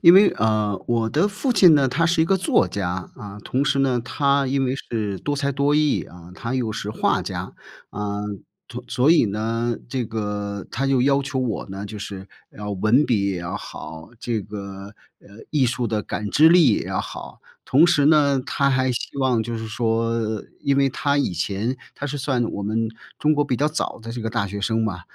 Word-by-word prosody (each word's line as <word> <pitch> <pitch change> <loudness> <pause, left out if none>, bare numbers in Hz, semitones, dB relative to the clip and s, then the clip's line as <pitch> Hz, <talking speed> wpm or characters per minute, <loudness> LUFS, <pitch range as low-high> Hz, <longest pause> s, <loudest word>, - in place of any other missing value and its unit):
因 170 +1 +9
为， 200 +2 +7
呃， 110 -3 +1
我 115 -2 0
的 160 +7 +2
父 210 +6 -1
亲 185 -6 +7
呢， 135 -2 +3
他 165 +7 +1
是 170 -1 +3
一 - - +3
个 195 +3 +2
作 180 - +2
家。 95 -1 -3
啊， 105 0 -9
同 135 +3 0
时 135 0 +2
呢， 130 -3 +2
他 140 +1 +1
因 135 0 +1
为 130 - 0
是 105 -7 -3
多 145 +7 -2
才 140 0 -1
多 140 +1 +1
艺 150 -1 +2
啊， 85 0 -13
他 115 +7 -4
又 120 -4 -1
是 105 -1 -4
画 - - +1
家。 - - -5 0.4
呃， 105 0 -3 0.4
同 - - -8
所 130 +5 +2
以 165 -7 +6
呢， 115 +3 -1
这 130 -1 -2
个 105 -2 -4
他 135 +3 -1
就 135 -2 +3
要 140 +1 +3
求 135 -1 -2
我 120 -6 -2
呢， 95 +1 -6
就 105 0 -7
是 100 -1 -7 0.3
要 105 0 -5
文 110 +8 +3
笔 100 -7 +1
也 90 - -3
要 85 +3 -4
好， 80 -1 -9
这 115 -3 -1
个， 100 0 -8 0.2
呃， - - -20 0.2
艺 140 -5 +3
术 120 -1 -1
的 110 -1 0
感 105 -1 -4
知 155 +2 +6
力 175 -2 +6
也 - - -3
要 - - -1
好。 - - -8 0.2
同 145 +5 +5
时 170 -5 +4
呢， 145 -3 +4
他 140 0 +1
还 130 -1 +2
希 125 - -5
望 130 -4 +2
就 115 0 -4
是 110 - -5
说 115 -1 -1 0.2
因 140 -1 +1
为 140 -1 +4
他 140 +2 0
以 140 - 0
前 100 +8 -2 0.2
他 145 - -4
是 145 +1 -4
算 130 -3 0
我 100 - -4
们 110 +2 -1 0.3
中 155 +1 +3
国 145 0 +2
比 130 - -1
较 145 +4 +1
早 155 - -2
的 115 +1 -7
这 120 -1 -5
个 110 - -2
大 115 -3 -1
学 100 +1 -5
生 110 +2 0
嘛， 95 -5 -3
120 Hz, 230 characters per minute, -22 LUFS, 105-140 Hz, 0.4 s, 因